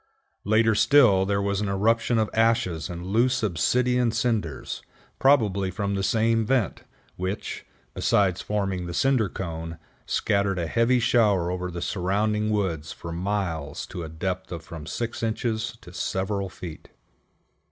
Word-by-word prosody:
Later 110 Hz, +2 st, +4 dB
still 105 Hz, -6 st, +5 dB
there 100 Hz, 0 st, +1 dB
was 100 Hz, 0 st, 0 dB
an 105 Hz, -, -1 dB
eruption 115 Hz, +4 st, +2 dB
of 110 Hz, -1 st, +2 dB
ashes 115 Hz, -7 st, +1 dB
and 85 Hz, 0 st, -6 dB
loose 120 Hz, +5 st, +2 dB
obsidian 125 Hz, +7 st, +2 dB
cinders, 110 Hz, -, -2 dB, 0.4 s
probably 105 Hz, -9 st, +3 dB
from 100 Hz, +2 st, -2 dB
the 100 Hz, -, -1 dB
same 115 Hz, +2 st, +2 dB
vent, 120 Hz, -1 st, 0 dB, 0.4 s
which, 95 Hz, +3 st, -4 dB, 0.3 s
besides 95 Hz, -3 st, +2 dB
forming 95 Hz, -4 st, -2 dB
the 85 Hz, -, -5 dB
Cinder 130 Hz, -7 st, +2 dB
Cone, 80 Hz, -2 st, -5 dB, 0.3 s
scattered 100 Hz, -1 st, +1 dB
a 85 Hz, -, -1 dB
heavy 115 Hz, +8 st, +2 dB
shower 105 Hz, -7 st, +3 dB
over 90 Hz, 0 st, -3 dB
the 85 Hz, 0 st, -5 dB
surrounding 105 Hz, +4 st, 0 dB
woods 90 Hz, -7 st, -1 dB
for 85 Hz, -, -7 dB
miles 85 Hz, -5 st, -2 dB
to 90 Hz, -, -7 dB
a 80 Hz, -, -6 dB
depth 90 Hz, +4 st, -4 dB
of 85 Hz, -2 st, -5 dB
from 80 Hz, -2 st, -9 dB
six 115 Hz, +8 st, -4 dB
inches 115 Hz, 0 st, -2 dB
to -, -, -13 dB
several 95 Hz, +1 st, -2 dB
feet. 90 Hz, -4 st, -9 dB
100 Hz, 145 wpm, -25 LUFS, 90-115 Hz, 0.4 s, still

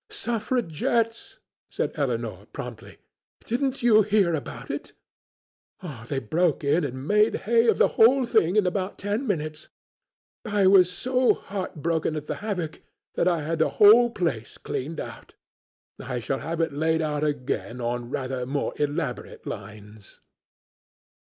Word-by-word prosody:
"Suffragettes," 230 Hz, -, -1 dB, 0.3 s
said -, -, -2 dB
Elinor -, -, -3 dB
promptly; -, -, -8 dB, 0.5 s
"didn't 260 Hz, +2 st, -1 dB
you 220 Hz, -3 st, +6 dB
hear 200 Hz, -4 st, +2 dB
about 155 Hz, -, -5 dB
it? -, -, -6 dB, 1.1 s
They 140 Hz, -, -2 dB
broke 155 Hz, +7 st, 0 dB
in 145 Hz, +4 st, +2 dB
and 130 Hz, 0 st, -5 dB
made 210 Hz, +1 st, +4 dB
hay 230 Hz, +2 st, +4 dB
of -, -, +4 dB
the -, -, +4 dB
whole 255 Hz, +4 st, +6 dB
thing 220 Hz, -6 st, +2 dB
in 210 Hz, -3 st, +4 dB
about 185 Hz, +2 st, -2 dB
ten 205 Hz, +6 st, -2 dB
minutes. 155 Hz, -5 st, -3 dB, 0.7 s
I 205 Hz, -3 st, +1 dB
was 185 Hz, -2 st, +6 dB
so 255 Hz, +7 st, +2 dB
heart 195 Hz, -1 st, -6 dB
broken 160 Hz, -1 st, 0 dB
at 150 Hz, -1 st, -4 dB
the -, -, -4 dB
havoc 180 Hz, -7 st, -4 dB, 0.3 s
that -, -, +1 dB
I 170 Hz, -4 st, +1 dB
had 165 Hz, +2 st, -2 dB
the 160 Hz, -, +3 dB
whole 225 Hz, +4 st, +8 dB
place 165 Hz, -, -3 dB
cleared 150 Hz, +5 st, -4 dB
out; -, -, -9 dB, 0.6 s
I 125 Hz, -1 st, -4 dB
shall 135 Hz, +3 st, -2 dB
have 165 Hz, +1 st, -3 dB
it 165 Hz, -3 st, 0 dB
laid 160 Hz, +2 st, +1 dB
out 150 Hz, -1 st, -1 dB
again 130 Hz, -4 st, -2 dB
on 120 Hz, 0 st, -3 dB
rather 130 Hz, -1 st, -3 dB
more 140 Hz, +1 st, -2 dB
elaborate 145 Hz, 0 st, -3 dB
lines." 105 Hz, 0 st, -9 dB
170 Hz, 145 wpm, -25 LUFS, 145-215 Hz, 1.1 s, whole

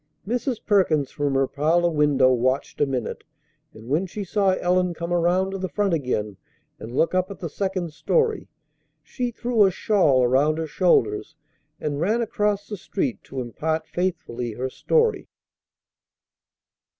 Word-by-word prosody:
Mrs. 245 Hz, +2 st, -1 dB
Perkins 160 Hz, -, +2 dB
from 145 Hz, -2 st, -1 dB
her 135 Hz, 0 st, +3 dB
parlor 165 Hz, +6 st, +1 dB
window 145 Hz, -4 st, +3 dB
watched 130 Hz, +3 st, -1 dB
a 145 Hz, -, +4 dB
minute; 130 Hz, -4 st, -3 dB, 0.5 s
and, 110 Hz, +1 st, -13 dB
when 155 Hz, +8 st, 0 dB
she 205 Hz, +3 st, -5 dB
saw 195 Hz, 0 st, +1 dB
Ellen 180 Hz, -1 st, +1 dB
come 170 Hz, +2 st, -3 dB
around 175 Hz, +2 st, +2 dB
to 195 Hz, -, -4 dB
the 185 Hz, 0 st, -3 dB
front 205 Hz, -3 st, 0 dB
again 110 Hz, -, -2 dB, 0.4 s
and 115 Hz, -, -8 dB
look 165 Hz, -, +2 dB
up 185 Hz, +1 st, +1 dB
at 200 Hz, -, -8 dB
the 170 Hz, -4 st, -6 dB
second 185 Hz, -4 st, -3 dB
story, 460 Hz, -, 0 dB, 0.6 s
she 250 Hz, -2 st, -3 dB
threw 235 Hz, -1 st, +1 dB
a 195 Hz, -, +5 dB
shawl 175 Hz, -9 st, +2 dB
around 140 Hz, +5 st, +3 dB
her 160 Hz, -, -2 dB
shoulders 185 Hz, -, +1 dB, 0.4 s
and 145 Hz, -1 st, -3 dB
ran 215 Hz, +7 st, +2 dB
across 210 Hz, -3 st, -1 dB
the 210 Hz, -, -5 dB
street 265 Hz, -, -3 dB
to 135 Hz, -, -5 dB
impart 155 Hz, +6 st, -2 dB
faithfully 140 Hz, -11 st, -3 dB
her 130 Hz, +4 st, -4 dB
story. 460 Hz, -, +1 dB
175 Hz, 155 wpm, -24 LUFS, 140-200 Hz, 0.6 s, a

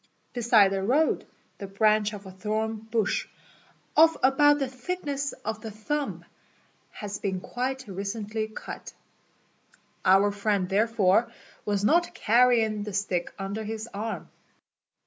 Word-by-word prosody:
Beside 230 Hz, -4 st, +5 dB
the 195 Hz, 0 st, -1 dB
road 270 Hz, +11 st, +1 dB, 0.3 s
the 200 Hz, -, -6 dB
branch 210 Hz, +1 st, +2 dB
of 205 Hz, -2 st, -9 dB
a 190 Hz, -, -9 dB
thorn 215 Hz, +3 st, -2 dB
bush, 225 Hz, -1 st, 0 dB, 0.3 s
} -, -, -30 dB, 0.3 s
of 325 Hz, +1 st, +6 dB
about 290 Hz, +2 st, +5 dB
the 275 Hz, -2 st, -1 dB
thickness 280 Hz, +1 st, -3 dB
of 220 Hz, 0 st, -3 dB
the 225 Hz, -, -6 dB
thumb, 280 Hz, +8 st, -3 dB, 0.6 s
has 205 Hz, -1 st, -6 dB
been 190 Hz, -2 st, -2 dB
quite 260 Hz, +5 st, -4 dB
recently 210 Hz, +3 st, -3 dB
cut. 220 Hz, -, -8 dB, 1.1 s
Our 195 Hz, +2 st, +5 dB
friend 200 Hz, -2 st, 0 dB
therefore 210 Hz, +1 st, +2 dB, 0.3 s
was 205 Hz, -1 st, 0 dB
not 340 Hz, +7 st, +3 dB
carrying 225 Hz, -2 st, +3 dB
the 205 Hz, 0 st, -5 dB
stick 185 Hz, -3 st, -1 dB
under 200 Hz, +2 st, -4 dB
his 220 Hz, +1 st, -5 dB
arm. 220 Hz, +3 st, -4 dB
215 Hz, 130 wpm, -27 LUFS, 200-245 Hz, 1.1 s, of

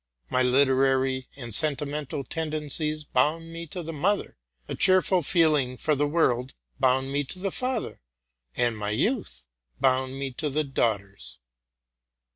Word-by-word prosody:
My 130 Hz, -, +2 dB
literary 130 Hz, 0 st, +2 dB
and 120 Hz, -5 st, -7 dB
sentimental 145 Hz, 0 st, +1 dB
tendencies 155 Hz, 0 st, -3 dB
bound 160 Hz, +5 st, 0 dB
me 170 Hz, 0 st, -7 dB
to 175 Hz, +3 st, -6 dB
the 165 Hz, +1 st, -6 dB
mother, 195 Hz, +7 st, 0 dB, 0.3 s
a -, -, -4 dB
cheer 185 Hz, -1 st, +5 dB
ful 185 Hz, -1 st, +1 dB
feeling 150 Hz, -6 st, +2 dB
for 155 Hz, -, +1 dB
the 145 Hz, +1 st, +1 dB
world 135 Hz, -5 st, +1 dB, 0.2 s
bound 130 Hz, +1 st, +2 dB
me 145 Hz, 0 st, +1 dB
to 135 Hz, -, -6 dB
the 195 Hz, +1 st, -3 dB
father, 255 Hz, -, -3 dB, 0.5 s
and 120 Hz, -2 st, +1 dB
my 105 Hz, -1 st, -3 dB
youth 190 Hz, -, -1 dB, 0.3 s
bound 130 Hz, 0 st, +1 dB
me 135 Hz, -1 st, -3 dB
to 150 Hz, +4 st, -3 dB
the 150 Hz, +3 st, 0 dB
daughters. 105 Hz, -8 st, -1 dB
140 Hz, 145 wpm, -26 LUFS, 130-160 Hz, 0.5 s, cheer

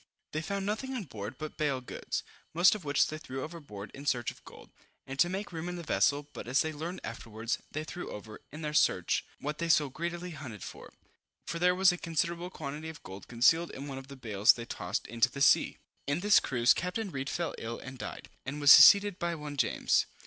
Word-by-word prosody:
They 155 Hz, -, -2 dB
found 195 Hz, +4 st, -3 dB
nothing 240 Hz, +6 st, -2 dB
on 235 Hz, -, -3 dB
board 110 Hz, -, -7 dB
but 155 Hz, -1 st, -7 dB
bale 145 Hz, -4 st, 0 dB
goods, 125 Hz, -, -5 dB, 0.3 s
most 175 Hz, +3 st, +6 dB
of 210 Hz, -4 st, -5 dB
which 145 Hz, 0 st, +3 dB
they 155 Hz, -, -5 dB
threw 135 Hz, -3 st, -6 dB
overboard 140 Hz, -12 st, -8 dB
in 140 Hz, +1 st, -9 dB
search 120 Hz, -4 st, +1 dB
of -, -, -18 dB
gold, -, -, -14 dB, 0.3 s
and 135 Hz, +1 st, -7 dB
to 175 Hz, -, +5 dB
make 195 Hz, +2 st, -4 dB
room 165 Hz, +1 st, -4 dB
in 180 Hz, -, -4 dB
the 170 Hz, -, -6 dB
vessel; 145 Hz, -2 st, +1 dB
but -, -, -8 dB
as 125 Hz, +3 st, +3 dB
they 160 Hz, 0 st, -2 dB
learned 165 Hz, +5 st, -5 dB
afterwards, 115 Hz, 0 st, -4 dB
they 155 Hz, -, -3 dB
threw 175 Hz, +3 st, -7 dB
over, 105 Hz, +1 st, -9 dB
in 155 Hz, +2 st, -8 dB
their 150 Hz, 0 st, -3 dB
search, -, -, +2 dB, 0.2 s
what 150 Hz, +1 st, -4 dB
they 170 Hz, 0 st, -2 dB
so 150 Hz, -3 st, +4 dB
greedily 170 Hz, +5 st, -4 dB
hunted 130 Hz, -, -8 dB
after, -, -, -9 dB, 0.6 s
for 170 Hz, -, -4 dB
there 180 Hz, +1 st, +4 dB
was 190 Hz, 0 st, +6 dB
a 175 Hz, -, -5 dB
considerable 170 Hz, +2 st, -1 dB
quantity 155 Hz, -1 st, -6 dB
of 160 Hz, -, -11 dB
gold 95 Hz, +1 st, -10 dB
concealed 165 Hz, +8 st, +3 dB
in 135 Hz, -, -7 dB
one 135 Hz, -1 st, -5 dB
of 135 Hz, -, -12 dB
the 140 Hz, -, -10 dB
bales 110 Hz, -5 st, +4 dB
they 115 Hz, -, -7 dB
tossed 90 Hz, -4 st, -3 dB
into 115 Hz, 0 st, +2 dB
the 140 Hz, -, -8 dB
sea! 140 Hz, -, +4 dB, 0.3 s
In 145 Hz, +4 st, 0 dB
this 205 Hz, +1 st, +6 dB
cruise 120 Hz, -2 st, +3 dB
Capt. 180 Hz, +2 st, -3 dB
Read 150 Hz, -12 st, -4 dB
fell 170 Hz, -1 st, -2 dB
ill 115 Hz, +1 st, -5 dB
and 130 Hz, 0 st, -10 dB
died, -, -, -7 dB, 0.2 s
and 140 Hz, +3 st, -5 dB
was 145 Hz, -1 st, +7 dB
succeeded 200 Hz, -2 st, +9 dB
by 170 Hz, 0 st, -1 dB
one 150 Hz, -2 st, -7 dB
James. 140 Hz, -, +2 dB
150 Hz, 225 wpm, -30 LUFS, 130-170 Hz, 0.6 s, succeeded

